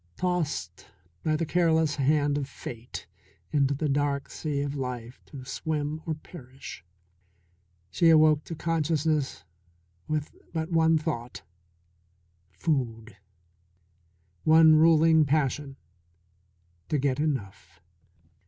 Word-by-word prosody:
Tossed 160 Hz, -, -2 dB, 0.4 s
by 155 Hz, -1 st, +1 dB
the 165 Hz, -, -1 dB
careless 160 Hz, -3 st, +2 dB
hand 145 Hz, +1 st, +2 dB
of 140 Hz, -1 st, -3 dB
Fate 120 Hz, -2 st, -8 dB, 0.5 s
into 140 Hz, -2 st, +2 dB
the 150 Hz, +2 st, -1 dB
dark 140 Hz, 0 st, -1 dB
sea 145 Hz, -3 st, -3 dB
of 140 Hz, 0 st, -2 dB
life 125 Hz, -3 st, -5 dB
to 135 Hz, -3 st, -10 dB
swim 150 Hz, +2 st, -3 dB
or 160 Hz, -, -1 dB
perish, 135 Hz, -, -11 dB, 1.1 s
she 165 Hz, -, +4 dB
awoke 155 Hz, -2 st, +5 dB
to 165 Hz, -, -6 dB
consciousness 155 Hz, -2 st, 0 dB, 0.6 s
with 155 Hz, -1 st, -3 dB, 0.2 s
but 160 Hz, +1 st, -3 dB
one 165 Hz, -1 st, +4 dB
thought 130 Hz, -7 st, -4 dB, 1.1 s
food; 115 Hz, -, -2 dB, 1.3 s
one 160 Hz, 0 st, +7 dB
ruling 160 Hz, 0 st, +5 dB
passion 140 Hz, -1 st, 0 dB, 1.1 s
to 150 Hz, -, +1 dB
get 135 Hz, -1 st, 0 dB
enough. 100 Hz, -, -3 dB
150 Hz, 105 wpm, -27 LUFS, 135-160 Hz, 1.3 s, one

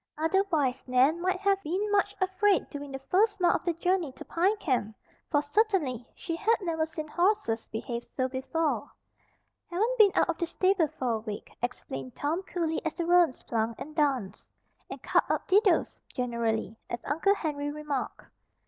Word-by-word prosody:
Otherwise 320 Hz, -5 st, +1 dB
Nan 265 Hz, +7 st, +3 dB
might 370 Hz, +1 st, 0 dB
have 395 Hz, -1 st, +2 dB
been 390 Hz, +6 st, -2 dB
much 410 Hz, 0 st, +2 dB
afraid 380 Hz, +1 st, +2 dB
during 285 Hz, -1 st, -6 dB
the 270 Hz, -, -4 dB
first 410 Hz, +2 st, +3 dB
mile 350 Hz, -1 st, +4 dB
of -, -, -2 dB
the 345 Hz, -, 0 dB
journey 355 Hz, -2 st, 0 dB
to -, -, -10 dB
Pine 380 Hz, +6 st, +1 dB
Camp, 245 Hz, -, -1 dB, 0.3 s
for 290 Hz, -2 st, +2 dB
certainly 300 Hz, -, +1 dB
she 330 Hz, -, -4 dB
had 440 Hz, +7 st, +3 dB
never 325 Hz, -4 st, -1 dB
seen 310 Hz, -1 st, -6 dB
horses 345 Hz, -, +1 dB
behave 235 Hz, +2 st, -4 dB
so 260 Hz, -1 st, +2 dB
before. 275 Hz, +5 st, -1 dB, 0.8 s
"Haven't 445 Hz, +8 st, 0 dB
been 410 Hz, -2 st, +8 dB
out -, -, +4 dB
of 335 Hz, -, -2 dB
the 340 Hz, -, 0 dB
stable 370 Hz, -2 st, +2 dB
for 255 Hz, -2 st, 0 dB
a 225 Hz, -, 0 dB
week," 215 Hz, -2 st, -7 dB
explained 135 Hz, -, -5 dB
Tom 315 Hz, +5 st, -1 dB
cooly 335 Hz, -4 st, -2 dB
as 320 Hz, -, -2 dB
the 340 Hz, -, -2 dB
roans 350 Hz, -5 st, +3 dB
plunged 225 Hz, 0 st, -2 dB
and 305 Hz, +1 st, -8 dB
danced, 270 Hz, -, -1 dB, 0.4 s
and -, -, -8 dB
"cut -, -, +3 dB
up -, -, -1 dB
didos" 390 Hz, -2 st, +3 dB, 0.2 s
generally, 235 Hz, -3 st, -1 dB
as 235 Hz, -, -5 dB
Uncle 330 Hz, +8 st, +2 dB
Henry 290 Hz, -5 st, -3 dB
remarked. 295 Hz, -2 st, -4 dB
320 Hz, 175 wpm, -29 LUFS, 260-375 Hz, 0.8 s, been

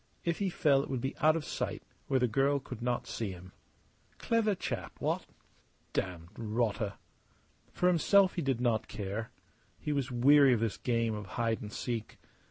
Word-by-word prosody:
If 170 Hz, -1 st, 0 dB
he 200 Hz, -2 st, +1 dB
fell 145 Hz, -5 st, +3 dB
it -, -, -7 dB
would 130 Hz, -, -1 dB
be 135 Hz, +3 st, -3 dB
out 155 Hz, 0 st, +4 dB
of 165 Hz, -, -2 dB
sight, -, -, -3 dB, 0.2 s
where 135 Hz, -, +2 dB
the 125 Hz, -, +3 dB
girl 135 Hz, +5 st, +2 dB
could 125 Hz, -3 st, -8 dB
not 120 Hz, 0 st, -1 dB
see 110 Hz, -3 st, -3 dB
him. 90 Hz, +1 st, -12 dB, 0.7 s
Clever 225 Hz, -3 st, +1 dB
chap -, -, -4 dB
what? -, -, -1 dB, 0.7 s
Damned 85 Hz, -2 st, -3 dB
rotter! 110 Hz, -2 st, -1 dB, 0.8 s
For -, -, -1 dB
himself 185 Hz, +3 st, +5 dB
he 175 Hz, -, -2 dB
did 135 Hz, -5 st, 0 dB
not 120 Hz, -3 st, +1 dB
care. 105 Hz, +2 st, -4 dB, 0.5 s
He 150 Hz, -, -2 dB
was 140 Hz, -2 st, -1 dB
weary 135 Hz, +2 st, +6 dB
of 120 Hz, -, +1 dB
this 115 Hz, -2 st, -1 dB
game 115 Hz, -2 st, 0 dB
of 105 Hz, -2 st, -5 dB
hide 115 Hz, -2 st, 0 dB
and 105 Hz, -, -7 dB
seek. 115 Hz, 0 st, -4 dB
125 Hz, 180 wpm, -31 LUFS, 110-145 Hz, 0.8 s, weary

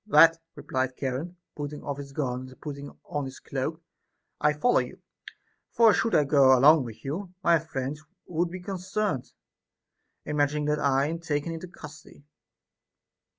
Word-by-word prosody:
That, 165 Hz, -2 st, +7 dB, 0.2 s
replied 130 Hz, 0 st, -2 dB
Charon, 140 Hz, +7 st, -3 dB, 0.2 s
putting 145 Hz, 0 st, -6 dB
off 140 Hz, -2 st, -4 dB
his 140 Hz, -1 st, -8 dB
garland 130 Hz, -2 st, -3 dB
and 130 Hz, -, -16 dB
putting 140 Hz, -1 st, -7 dB, 0.2 s
on 145 Hz, -2 st, -3 dB
his 130 Hz, 0 st, -8 dB
cloak, 155 Hz, +5 st, -4 dB, 0.6 s
I 150 Hz, -, +4 dB
follow 150 Hz, +12 st, +3 dB
you; -, -, -5 dB, 0.7 s
for 225 Hz, -3 st, +5 dB
should 225 Hz, -, +1 dB
I 150 Hz, -, +5 dB
go 135 Hz, -2 st, +6 dB
along 145 Hz, +2 st, +6 dB
with 115 Hz, +2 st, -10 dB
you, 180 Hz, +6 st, -4 dB
my 170 Hz, -1 st, +5 dB
friends 150 Hz, -2 st, -4 dB, 0.2 s
would 175 Hz, 0 st, -1 dB
be 185 Hz, +1 st, -7 dB
concerned, 190 Hz, -5 st, -2 dB, 0.9 s
imagining 150 Hz, 0 st, 0 dB
that 150 Hz, 0 st, +1 dB
I 140 Hz, -1 st, +2 dB
am 165 Hz, +3 st, -3 dB
taken 155 Hz, -1 st, -2 dB
into 165 Hz, +2 st, -6 dB
custody. 150 Hz, -4 st, -13 dB
150 Hz, 150 wpm, -27 LUFS, 135-165 Hz, 0.9 s, That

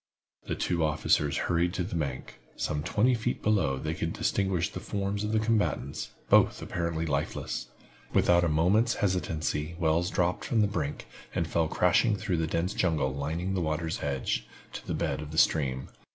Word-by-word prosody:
The -, -, -1 dB
two 85 Hz, -2 st, 0 dB
officers 75 Hz, -1 st, +2 dB
hurried 85 Hz, 0 st, +1 dB
to 90 Hz, -, 0 dB
the 90 Hz, -, -6 dB
bank. 70 Hz, -5 st, -4 dB, 0.2 s
Some 75 Hz, -1 st, -2 dB
twenty 105 Hz, -, +2 dB
feet 120 Hz, +1 st, -2 dB
below 95 Hz, -11 st, +2 dB
they -, -, -3 dB
could -, -, -2 dB
distinguish 95 Hz, -3 st, 0 dB
the -, -, -5 dB
forms 100 Hz, 0 st, -2 dB
of 105 Hz, -, -1 dB
the 110 Hz, -, +2 dB
combatants, 110 Hz, -10 st, 0 dB, 0.2 s
both -, -, +5 dB
apparently 85 Hz, -2 st, -2 dB
lifeless. 70 Hz, -4 st, -2 dB, 0.4 s
Without 85 Hz, 0 st, +4 dB
a 85 Hz, -, +2 dB
moment's 95 Hz, +10 st, +3 dB
hesitancy, 85 Hz, -4 st, -1 dB
Wells 85 Hz, +1 st, +2 dB
dropped 90 Hz, 0 st, 0 dB
from 115 Hz, -, +1 dB
the -, -, +5 dB
brink, 80 Hz, -7 st, -3 dB, 0.3 s
and -, -, +1 dB
fell 80 Hz, -1 st, +1 dB
crashing 90 Hz, +7 st, +3 dB
through 95 Hz, -3 st, -1 dB
the 80 Hz, 0 st, 0 dB
dense 85 Hz, +4 st, -1 dB
jungle 80 Hz, -7 st, +1 dB
lining 80 Hz, +7 st, -2 dB
the 95 Hz, -, 0 dB
water's 80 Hz, 0 st, -2 dB
edge, 70 Hz, -3 st, -1 dB, 0.3 s
to -, -, -8 dB
the -, -, -1 dB
bed -, -, -1 dB
of 75 Hz, -, -7 dB
the 80 Hz, -, -7 dB
stream. 65 Hz, -5 st, +2 dB
85 Hz, 180 wpm, -29 LUFS, 75-95 Hz, 0.4 s, both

